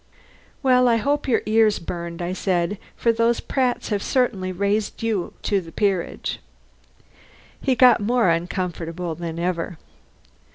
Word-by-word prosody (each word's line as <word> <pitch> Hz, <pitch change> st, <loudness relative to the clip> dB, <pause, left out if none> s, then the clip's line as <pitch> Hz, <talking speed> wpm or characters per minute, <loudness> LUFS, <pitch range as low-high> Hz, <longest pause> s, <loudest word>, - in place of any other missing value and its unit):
"Well, 250 Hz, -1 st, +5 dB
I 235 Hz, -, +4 dB
hope 285 Hz, +6 st, 0 dB
your 250 Hz, -, +2 dB
ears 215 Hz, -1 st, +3 dB
burned," 170 Hz, 0 st, -5 dB
I 175 Hz, +1 st, -2 dB
said, 185 Hz, +1 st, -1 dB, 0.2 s
"for 230 Hz, -, +2 dB
those 230 Hz, +1 st, +2 dB
Pratts 255 Hz, -2 st, -1 dB
have 205 Hz, -2 st, 0 dB
certainly 215 Hz, -9 st, 0 dB
raised 200 Hz, +4 st, -1 dB
you 215 Hz, -6 st, -1 dB
to 200 Hz, -2 st, +1 dB
the 165 Hz, -2 st, -12 dB
peerage." 195 Hz, -4 st, -1 dB, 1.2 s
He 260 Hz, -, +2 dB
got 250 Hz, 0 st, +6 dB
more 230 Hz, -1 st, +2 dB
uncomfortable 170 Hz, 0 st, -2 dB
than 165 Hz, 0 st, -6 dB
ever. 170 Hz, -1 st, -2 dB
200 Hz, 135 wpm, -23 LUFS, 175-230 Hz, 1.2 s, got